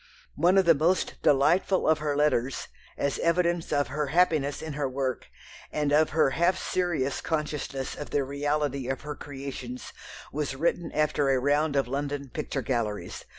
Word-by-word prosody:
One 180 Hz, +3 st, +3 dB
of 190 Hz, -, +5 dB
the 170 Hz, -, +7 dB
most 165 Hz, +5 st, 0 dB
delightful 165 Hz, +7 st, +3 dB
of 160 Hz, 0 st, +4 dB
her 150 Hz, -1 st, -1 dB
letters, 140 Hz, -3 st, +1 dB, 0.3 s
as 140 Hz, -, -1 dB
evidence 170 Hz, 0 st, +1 dB
of 145 Hz, -3 st, +1 dB
her 150 Hz, +2 st, -2 dB
happiness 155 Hz, -3 st, +2 dB
in 160 Hz, -1 st, -5 dB
her 140 Hz, -2 st, -1 dB
work, 130 Hz, -1 st, -2 dB, 0.4 s
and 150 Hz, -1 st, 0 dB
of 155 Hz, +1 st, +4 dB
her 155 Hz, -4 st, +3 dB
half 170 Hz, +5 st, +2 dB
serious 165 Hz, -7 st, -1 dB
consciousness 150 Hz, -4 st, -3 dB
of 145 Hz, -, -7 dB
the 145 Hz, -, +1 dB
reality 140 Hz, -1 st, -1 dB
of 135 Hz, -, -2 dB
her 150 Hz, +1 st, -5 dB
creations, 135 Hz, -3 st, -7 dB, 0.4 s
was 145 Hz, -2 st, -2 dB
written 170 Hz, +4 st, 0 dB
after 150 Hz, -2 st, +1 dB
a 135 Hz, -, +4 dB
round 145 Hz, +2 st, +1 dB
of 135 Hz, -2 st, +2 dB
London 140 Hz, +1 st, -3 dB
picture 140 Hz, -1 st, -3 dB
galleries. 115 Hz, -5 st, -3 dB
145 Hz, 165 wpm, -27 LUFS, 135-155 Hz, 0.4 s, the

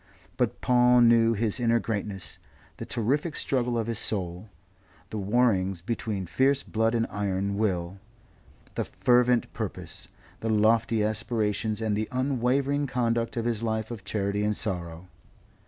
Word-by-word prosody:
But 125 Hz, -3 st, -1 dB
Paul 125 Hz, 0 st, +5 dB
knew 115 Hz, -1 st, +5 dB
his 110 Hz, +1 st, 0 dB
inner 115 Hz, -1 st, +3 dB
greatness, 105 Hz, -4 st, -4 dB, 0.4 s
the -, -, -7 dB
terrific 145 Hz, +8 st, -1 dB
struggle 125 Hz, -3 st, 0 dB
of 115 Hz, -, 0 dB
his 115 Hz, -1 st, -1 dB
soul, 95 Hz, -1 st, -2 dB, 0.6 s
the 110 Hz, -, -3 dB
warrings 95 Hz, -4 st, +1 dB
between 110 Hz, -3 st, -3 dB
fierce 135 Hz, -, +2 dB
blood 110 Hz, +1 st, 0 dB
and 115 Hz, -1 st, +2 dB
iron 100 Hz, -1 st, -1 dB
will, 95 Hz, -3 st, -1 dB, 0.7 s
the -, -, -1 dB
fervent 125 Hz, -1 st, +2 dB
purpose, -, -, -4 dB, 0.3 s
the 115 Hz, -, -3 dB
lofty 110 Hz, +1 st, +3 dB
aspirations 110 Hz, 0 st, -1 dB
and 110 Hz, -2 st, 0 dB
the 110 Hz, +1 st, -2 dB
unwavering 135 Hz, +2 st, 0 dB
conduct 120 Hz, -1 st, -1 dB
of 115 Hz, -, -1 dB
his 115 Hz, -2 st, -1 dB
life 110 Hz, 0 st, -2 dB
of 110 Hz, -5 st, -7 dB
charity 100 Hz, 0 st, -1 dB
and 105 Hz, 0 st, 0 dB
sorrow. 85 Hz, -3 st, -3 dB
110 Hz, 140 wpm, -27 LUFS, 105-120 Hz, 0.7 s, Paul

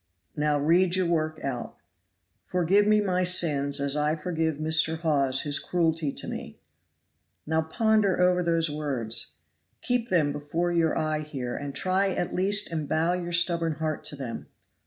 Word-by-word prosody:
"Now 150 Hz, 0 st, +1 dB
read 175 Hz, +5 st, +3 dB
your 185 Hz, -1 st, +1 dB
work 155 Hz, -2 st, -1 dB
out." 125 Hz, -4 st, -4 dB, 0.7 s
"'Forgive 180 Hz, +4 st, +2 dB
me 215 Hz, 0 st, +4 dB
my 185 Hz, -2 st, 0 dB
sins 150 Hz, -6 st, +1 dB
as 140 Hz, 0 st, -1 dB
I 150 Hz, +1 st, +1 dB
forgive 160 Hz, -1 st, -2 dB
Mr. 160 Hz, +1 st, +2 dB
Hawes 140 Hz, -5 st, +1 dB
his 145 Hz, -1 st, 0 dB
cruelty 165 Hz, -4 st, 0 dB
to -, -, -8 dB
me.'" -, -, -7 dB, 0.9 s
"Now 160 Hz, +1 st, +1 dB
ponder 200 Hz, +4 st, +1 dB
over 180 Hz, 0 st, +3 dB
those 165 Hz, -1 st, +1 dB
words. 120 Hz, -, -2 dB, 0.5 s
Keep 245 Hz, -1 st, 0 dB
them 155 Hz, -5 st, +2 dB
before 150 Hz, +4 st, -2 dB
your 165 Hz, -2 st, +1 dB
eye 155 Hz, -1 st, 0 dB
here, 135 Hz, -5 st, -5 dB
and 140 Hz, -1 st, -6 dB
try 190 Hz, +1 st, +1 dB
at 175 Hz, -, -2 dB
least 200 Hz, +1 st, 0 dB
and 155 Hz, -3 st, -3 dB
bow 165 Hz, +3 st, +1 dB
your 175 Hz, -1 st, -3 dB
stubborn 170 Hz, -1 st, +1 dB
heart 155 Hz, 0 st, -3 dB
to -, -, -5 dB
them. 130 Hz, -4 st, -6 dB
160 Hz, 160 wpm, -27 LUFS, 150-180 Hz, 0.9 s, me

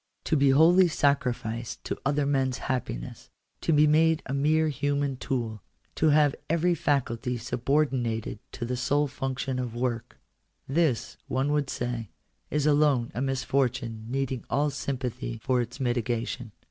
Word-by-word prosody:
To -, -, +1 dB
be 140 Hz, -2 st, +4 dB
wholly 170 Hz, +7 st, +6 dB
sacrificed 125 Hz, -6 st, -1 dB
to -, -, -4 dB
other 145 Hz, +1 st, +1 dB
men's 135 Hz, -3 st, +1 dB
happiness; 115 Hz, -, -4 dB, 0.3 s
to -, -, +1 dB
be 150 Hz, -1 st, +6 dB
made 160 Hz, +1 st, +3 dB
a 135 Hz, -, -4 dB
mere 155 Hz, +3 st, +2 dB
human 145 Hz, 0 st, -1 dB
tool; 120 Hz, -5 st, -3 dB, 0.3 s
to 160 Hz, -, +2 dB
have 150 Hz, -1 st, +4 dB, 0.2 s
every 170 Hz, +2 st, +2 dB
faculty 125 Hz, -6 st, 0 dB
subordinated 120 Hz, -2 st, -1 dB
to 120 Hz, -, -4 dB
the 125 Hz, +2 st, -2 dB
sole 145 Hz, +4 st, +1 dB
function 130 Hz, -1 st, -3 dB
of 120 Hz, -2 st, -4 dB
work 120 Hz, -1 st, -3 dB, 0.2 s
— -, -, -47 dB
this, 145 Hz, -4 st, 0 dB
one 135 Hz, +3 st, 0 dB
would 150 Hz, -2 st, +1 dB
say, 120 Hz, -3 st, -3 dB, 0.4 s
is 150 Hz, -1 st, 0 dB
alone 145 Hz, -5 st, +3 dB
a 120 Hz, -, -3 dB
misfortune, 130 Hz, -4 st, -1 dB
needing 135 Hz, -1 st, -2 dB
all 145 Hz, +1 st, +1 dB
sympathy 130 Hz, -3 st, -4 dB
for 130 Hz, -2 st, +2 dB
its 120 Hz, +3 st, -6 dB
mitigation. 120 Hz, -2 st, -2 dB
135 Hz, 145 wpm, -27 LUFS, 120-145 Hz, 0.4 s, wholly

